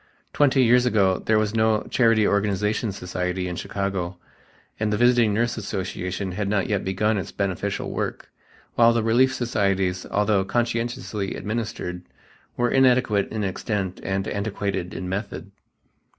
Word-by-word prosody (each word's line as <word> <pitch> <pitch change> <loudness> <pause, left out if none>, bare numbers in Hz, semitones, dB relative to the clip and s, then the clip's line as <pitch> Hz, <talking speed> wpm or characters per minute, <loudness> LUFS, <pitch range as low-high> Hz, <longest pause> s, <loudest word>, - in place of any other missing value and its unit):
Twenty 135 -2 +4
years 125 +1 +4
ago 95 -5 +2
there 110 - +2
was 110 0 0
no 110 -1 +2
Charity 115 -4 +3
Organization 105 +2 0
Society 90 -1 -3
in 90 - -4
Chicago 95 -1 -3 0.6
and 110 -1 0
the 105 - +1
Visiting 120 -1 +4
Nurse 115 +3 0
Association 95 -2 -4
had 100 +2 -2
not 100 -2 +1
yet 105 -3 -1
begun 105 +3 0
its 90 - -6
beneficial 100 -3 -2
work, - - -4 0.4
while 115 0 +5
the 115 -1 +1
relief 120 +4 +4
societies, 100 -7 0
although 105 -1 +2
conscientiously 115 -2 -2
administered, 105 -5 -4 0.6
were 120 0 +1
inadequate 125 -6 +3
in 110 -1 -2
extent 95 -1 -3
and 95 0 -2
antiquated 100 -3 -3
in 90 - -4
method. 100 +3 -5
105 Hz, 140 wpm, -24 LUFS, 95-115 Hz, 0.6 s, while